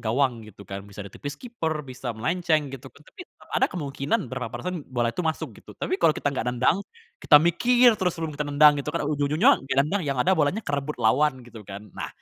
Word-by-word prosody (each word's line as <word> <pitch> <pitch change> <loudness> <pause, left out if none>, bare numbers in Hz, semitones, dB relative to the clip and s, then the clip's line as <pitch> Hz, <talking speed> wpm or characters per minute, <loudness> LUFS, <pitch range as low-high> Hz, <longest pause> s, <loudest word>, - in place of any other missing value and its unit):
gawang 120 -1 +1
gitu 100 0 -14
kan, 100 0 -6
bisa 100 0 -11
ditipis 145 +9 -7
kiper, 165 -11 -3
bisa 125 -2 -5
melenceng 155 +5 0
gitu. 135 0 -9
Tapi 150 - -14 0.3
ada - - +4
kemungkinan 140 -5 -2
berapa 115 -1 -4
persen 170 +5 -5
bola 120 -2 0
itu - - -3
masuk 160 -1 -3
gitu. - - -14
Tapi 375 - -1
kalau 155 - +5
kita 145 - -1
enggak 130 - -3
nendang, 125 +9 +2 0.4
kita 150 - +7
mikir 240 +8 +4
terus 180 -3 0
sebelum 160 -2 -4
kita 150 - -2
nendang 145 0 +6
gitu 150 - -2
kan - - -1
ujung-ujungnya 150 - +3 0.2
nendang 180 +8 0
yang 140 -2 -1
ada 190 - +3
bolanya 155 +7 +1
kerebut 145 +1 -3
lawan 130 +4 +2
gitu 115 -2 -11
kan. 100 +2 -9
Nah, - - -4
145 Hz, 200 wpm, -25 LUFS, 125-165 Hz, 0.4 s, kita